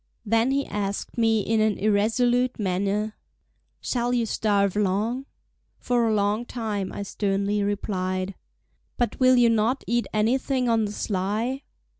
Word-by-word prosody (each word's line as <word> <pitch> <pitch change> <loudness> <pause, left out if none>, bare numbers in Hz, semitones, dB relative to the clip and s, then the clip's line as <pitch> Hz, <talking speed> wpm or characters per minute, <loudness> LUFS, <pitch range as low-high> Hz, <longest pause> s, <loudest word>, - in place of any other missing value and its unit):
Then 225 +3 +2
he 275 +1 +1
asked 205 -1 -4
me 225 -2 +2
in 220 +2 +1
an 215 -1 +2
irresolute 230 +5 +2
manner: 200 +2 -1 0.7
"Shall 245 0 -1
you 235 -1 +1
starve 200 -3 +1
long?" 210 +7 0 0.5
"For 240 -2 +1
a 220 - +2
long 205 +2 +1
time," 215 -5 -3
I 205 - -5
sternly 200 +1 -1
replied. 190 -2 -2 0.6
"But 240 -3 -1
will 255 0 +6
you 240 -2 +5
not 230 +4 +1
eat 240 0 0
anything 250 +4 +1
on 225 -2 +2
the 205 - -4
sly?" 210 +7 -2
215 Hz, 140 wpm, -25 LUFS, 200-240 Hz, 0.7 s, will